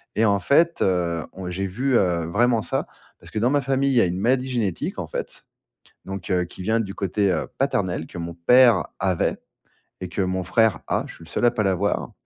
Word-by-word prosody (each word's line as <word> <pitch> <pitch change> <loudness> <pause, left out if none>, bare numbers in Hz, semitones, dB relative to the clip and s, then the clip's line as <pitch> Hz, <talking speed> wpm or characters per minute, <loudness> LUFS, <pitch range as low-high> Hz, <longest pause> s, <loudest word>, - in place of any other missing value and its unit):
et 110 - +2
en 100 -2 +3
fait, 165 - +2
heu, 85 -3 +1
on 95 -1 -6
j'ai 95 +2 -3
vu, 125 +7 +1
heu, 85 -4 +1
vraiment 115 +6 +2
ça. - - -2 0.3
Parce - - -13
que - - -5
dans 120 +4 +2
ma 145 0 +2
famille, 135 +1 +1
il - - 0
y 120 - +6
a - - +4
une 90 0 -2
maladie 130 +5 +1
génétique, 110 -8 -2
en - - -3
fait, - - -6 0.6
donc, 95 -1 -6
heu, 90 -1 +2
qui 85 - -11
vient 110 +5 +1
du 100 -3 -4
côté, 100 +1 0
heu, 85 - -1
paternel, 95 - -1
que - - -10
mon 85 0 -5
père 120 +8 +5
avait 95 -2 0 0.7
et 90 - -5
que 95 - -2
mon 95 0 -1
frère 110 +4 +2
a, - - 0
je - - -11
suis - - -14
le 80 - -14
seul 120 - 0
à 120 - +5
pas 105 - -1
l'avoir 95 +1 0
100 Hz, 230 wpm, -23 LUFS, 90-120 Hz, 0.7 s, y